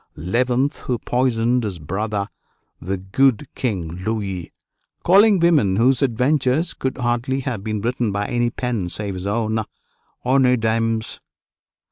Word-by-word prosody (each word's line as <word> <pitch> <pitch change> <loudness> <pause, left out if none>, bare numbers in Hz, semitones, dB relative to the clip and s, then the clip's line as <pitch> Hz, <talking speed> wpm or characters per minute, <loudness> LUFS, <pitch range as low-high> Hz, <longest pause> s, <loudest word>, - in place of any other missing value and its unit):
who 125 - 0
poisoned 120 -1 +1
his 100 -5 -3
brother, 100 +6 -3 0.5
the 95 +3 -2
good 125 +8 +1
King 90 -7 -3
Louis, 100 -5 -3 0.5
calling 200 +3 +6
women 150 - +3
whose 125 +6 +3
adventures 135 +5 +1
could 130 - -3
hardly 125 +2 -1
have 125 -7 -4
been 110 -1 -3
written 120 -1 -1
by 100 +1 -1
any 120 +1 0
pen 120 -7 -3
save 100 +1 -2
his 90 +1 -5
own, 110 +1 0 0.6
honnêtes 125 -1 +3
dames." 115 0 -1
115 Hz, 125 wpm, -21 LUFS, 100-130 Hz, 0.6 s, calling